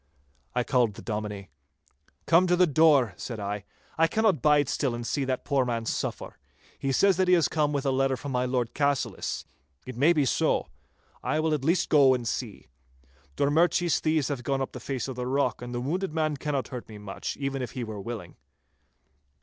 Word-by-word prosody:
I 125 - +2
called 120 -5 +1
the - - -10
Dominie. 105 -3 -5 0.7
'Come 170 +2 +5
to 180 - +3
the 180 +1 +5
door,' 145 - +4
said 115 -3 -6
I. 100 0 -4 0.3
'I 165 - +5
cannot 210 - +1
bide 145 -1 +4
still 130 -3 -1
and 120 0 -5
see 140 +3 -1
that 130 -1 -2
poor 140 -3 +2
man 115 -2 -2
suffer. - - -4 0.4
He 135 - -1
says 190 +7 +3
that 185 -1 +2
he 180 - +6
has 165 -4 +3
come 150 -2 0
with 140 -1 -2
a 135 - +2
letter 135 0 +1
from 145 +1 -6
my 125 0 0
Lord 125 -2 -1
Cassillis. 140 -2 -1 0.4
It 130 - -7
may 145 +8 +4
be 150 -5 +2
so. - - +1 0.5
I 155 - 0
will 155 0 +1
at 145 -3 -1
least 170 +4 +1
go 135 -4 +6
and 120 -2 -4
see. 110 -2 -4 0.7
Drummurchie's 165 +4 +2
thieves 155 -3 +1
have 140 -4 -3
gone 135 +2 -1
up 135 - -3
the 125 - -8
face 130 +1 -4
of 130 - -5
the 125 0 -3
rock, 130 -2 0
and 120 0 -6
the 120 - -3
wounded 160 +6 -2
man 155 -2 +1
cannot 140 -1 -3
hurt 125 -4 -7
me 110 - -9
much, 105 -1 -6
even 135 -1 -3
if 125 - -5
he 125 - -4
were 110 -3 -6
willing. 100 -5 -7
135 Hz, 205 wpm, -27 LUFS, 120-155 Hz, 0.7 s, he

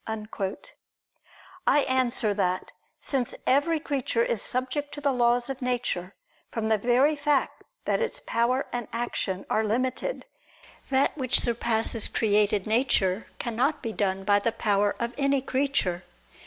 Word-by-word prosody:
I - - +5
answer 255 -4 +1
that, 185 -2 -1 0.3
Since 260 -4 -2
every 295 +5 +2
creature 270 -6 -1
is 230 - -1
subject 260 +3 -2
to - - -6
the 280 -1 +2
laws 240 0 +2
of 270 0 -5
nature, 240 -7 -2 0.3
from 220 -1 -2
the 220 -1 +3
very 250 +7 +3
fact 285 -1 0 0.2
that - - +1
its 470 - -2
power 245 +4 +1
and 240 -2 -3
action 220 -5 -3
are 220 - +1
limited: 255 - -2 0.6
that 270 0 +2
which 255 -4 +2
surpasses 230 -2 +2
created 210 -2 +2
nature, 215 -4 +1
cannot 245 +6 -1
be 225 -2 -3
done 195 -2 -1
by 205 +1 +4
the 230 +3 0
power 205 -2 +1
of 235 0 -3
any 275 0 +2
creature. 260 -10 -1
240 Hz, 140 wpm, -26 LUFS, 215-270 Hz, 0.6 s, I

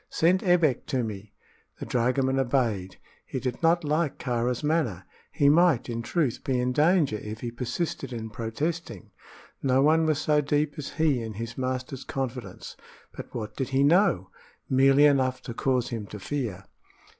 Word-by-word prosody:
"Send 180 +4 +2
Ebbek 170 - +2
to 130 -5 0
me." 105 -2 -6 0.5
The - - -5
dragoman 130 +2 +1
obeyed. 115 -8 0 0.3
He 130 - -5
did 125 -1 -4
not 170 +1 +3
like 155 0 0
Kāra's 125 +1 -1
manner. 145 - 0 0.3
He 140 - +2
might, 160 -4 +4
in 115 0 -3
truth, 140 0 -1
be 130 -2 0
in 125 0 0
danger 150 - +3
if 105 +1 -7
he 120 - -4
persisted 130 +3 -3
in 110 -2 -6
protesting. 115 - -4 0.5
No 135 0 +3
one 160 +2 +4
was 155 -2 +2
so 150 -1 +2
deep 145 +1 0
as 140 - -6
he 150 -6 +1
in 110 -1 -5
his 115 +2 -6
master's 130 +1 -3
confidence. 130 -2 -5 0.4
But - - -9
what 110 -3 -5
did 135 -2 -3
he 135 +1 +2
know? 145 - +3 0.4
Merely 135 +2 +5
enough 130 -3 +2
to 120 - -6
cause 125 0 0
him 110 -4 -5
to 105 - -8
fear. 100 -4 -4
130 Hz, 165 wpm, -26 LUFS, 115-150 Hz, 0.5 s, Merely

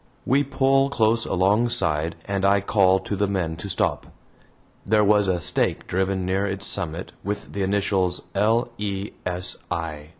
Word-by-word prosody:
We 140 +3 +3
pull 135 0 +2
close 115 -4 +1
alongside 95 -5 +1
and 100 -1 -2
I 100 +1 +4
call 95 -1 +3
to 100 - -4
the 100 +1 0
men 90 -5 -2
to 100 +4 -6
stop. - - -1 0.8
There 105 +1 +3
was 105 -1 +4
a 90 -2 +1
stake 80 - 0
driven 95 0 -1
near 95 +2 0
its 95 0 -4
summit 85 -2 -3
with 100 0 -5
the 100 - -3
initials, 95 -2 0
"L. 115 +3 +2
E. 100 -1 -3 0.2
S. 90 0 0
I." 75 -3 -4
100 Hz, 160 wpm, -23 LUFS, 90-105 Hz, 0.8 s, I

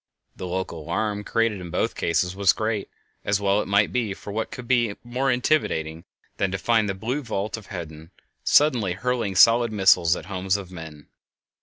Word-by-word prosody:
The 90 - -6
local 90 -2 -4
alarm 105 +6 -2
created 115 -3 0
in 90 - -7
both - - -1
cases 90 +2 0
was 100 -2 +4
great, 110 -2 -2 0.3
as 100 0 +1
well 100 +1 +2
it - - -6
might 100 +1 +2
be, 115 -6 -1
for 100 - -9
what 110 +1 -2
could 125 -2 -9
be 120 -5 +2
more 125 +3 -1
intimidating 95 - 0 0.3
than 95 - +1
to 95 - -2
find 110 0 +1
the 95 - -2
blue 120 +9 -3
vault 110 -4 -3
of 110 -3 -11
heaven 80 -3 -8 0.3
suddenly 125 -11 +3
hurling 115 -1 -2
solid 115 +4 +6
missiles 95 -4 +4
at - - -7
the - - -14
homes 95 0 0
of 95 -2 -9
men? 80 -4 -10
100 Hz, 190 wpm, -24 LUFS, 90-115 Hz, 0.3 s, solid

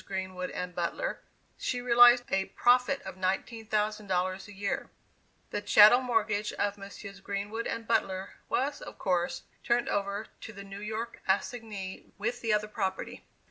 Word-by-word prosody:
Greenwood 185 -1 -4
and 180 0 -5
Butler, 175 - -2 0.4
she 245 - -1
realized 245 0 +7
a 195 0 +2
profit 250 +5 +3
of - - -8
$19,000 200 -1 -1
a - - -11
year. 200 0 -3 0.6
The - - -2
chattel 210 +4 +8
mortgage 215 -4 0
of 205 0 0
Messrs. 200 -1 -10
Greenwood 205 +3 -3
and 230 0 -4
Butler, 190 -4 0 0.2
was, 285 +2 0
of - - -9
course, 175 -2 0 0.2
turned 240 0 +2
over 200 +1 -1
to 220 - -9
the 200 -1 -9
New 195 0 -9
York 220 +2 -5
assignee 200 -1 -2
with 235 +4 -2
the 225 - 0
other 210 0 +2
property. 195 -3 -3
205 Hz, 145 wpm, -30 LUFS, 190-230 Hz, 0.6 s, chattel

